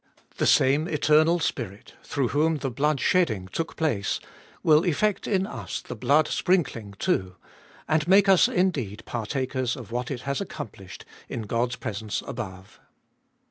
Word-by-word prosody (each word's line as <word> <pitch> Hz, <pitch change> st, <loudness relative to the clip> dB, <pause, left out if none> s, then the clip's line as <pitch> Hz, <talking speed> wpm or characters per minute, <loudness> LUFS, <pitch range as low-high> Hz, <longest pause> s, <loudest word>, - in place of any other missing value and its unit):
The -, -, +1 dB
same 145 Hz, +5 st, +4 dB
Eternal 155 Hz, +2 st, +3 dB
Spirit, 110 Hz, -, -4 dB
through 135 Hz, -4 st, -1 dB
whom 155 Hz, +4 st, +2 dB
the 135 Hz, -2 st, -3 dB
blood 145 Hz, +3 st, +1 dB
shedding 115 Hz, -, +1 dB
took 165 Hz, -, -4 dB
place, 140 Hz, -12 st, 0 dB, 0.4 s
will 155 Hz, 0 st, +5 dB
effect 195 Hz, +4 st, 0 dB
in 195 Hz, -2 st, +1 dB
us 215 Hz, -, -5 dB
the 125 Hz, -, -8 dB
blood 140 Hz, +7 st, +3 dB
sprinkling 140 Hz, -, 0 dB
too, 95 Hz, -1 st, 0 dB, 0.5 s
and 155 Hz, +1 st, +1 dB
make 195 Hz, +2 st, +6 dB
us 190 Hz, -2 st, +6 dB
indeed 130 Hz, -, -1 dB
partakers 130 Hz, +2 st, -2 dB
of 120 Hz, -5 st, -10 dB
what 120 Hz, +1 st, -2 dB
it 125 Hz, -3 st, -4 dB
has 140 Hz, +7 st, -2 dB
accomplished 100 Hz, -, -8 dB, 0.2 s
in 115 Hz, -, -4 dB
God's 120 Hz, +3 st, -1 dB
presence 105 Hz, -3 st, -4 dB
above. 95 Hz, -6 st, -7 dB
135 Hz, 145 wpm, -26 LUFS, 115-160 Hz, 0.5 s, make